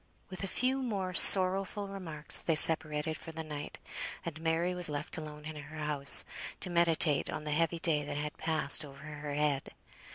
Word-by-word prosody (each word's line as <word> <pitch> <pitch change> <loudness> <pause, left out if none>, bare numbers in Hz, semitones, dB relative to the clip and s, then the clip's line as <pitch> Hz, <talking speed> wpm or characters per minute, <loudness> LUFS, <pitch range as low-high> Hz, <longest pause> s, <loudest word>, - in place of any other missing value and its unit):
With 185 - -7
a - - -3
few 260 +7 -1
more 195 -7 -4
sorrowful 195 +2 +5
remarks 170 -6 -2
they 165 - -1
separated 155 0 +4
for 165 - -10
the 160 0 -7
night, 150 -2 -8 0.5
and 160 -1 -7
Mary 165 +2 -1
was 180 -2 +2
left 145 0 -5
alone 150 -1 -8
in 155 0 -8
her 150 +2 -11
house, 150 -2 -1 0.4
to 180 - -5
meditate 165 -4 +2
on - - -6
the 150 - -5
heavy 165 +2 0
day 160 -3 -1
that 145 0 -6
had 150 0 -5
passed 155 -2 +4
over 140 0 -13
her 150 -1 -7
head. 145 -2 -1
155 Hz, 185 wpm, -30 LUFS, 150-175 Hz, 0.5 s, sorrowful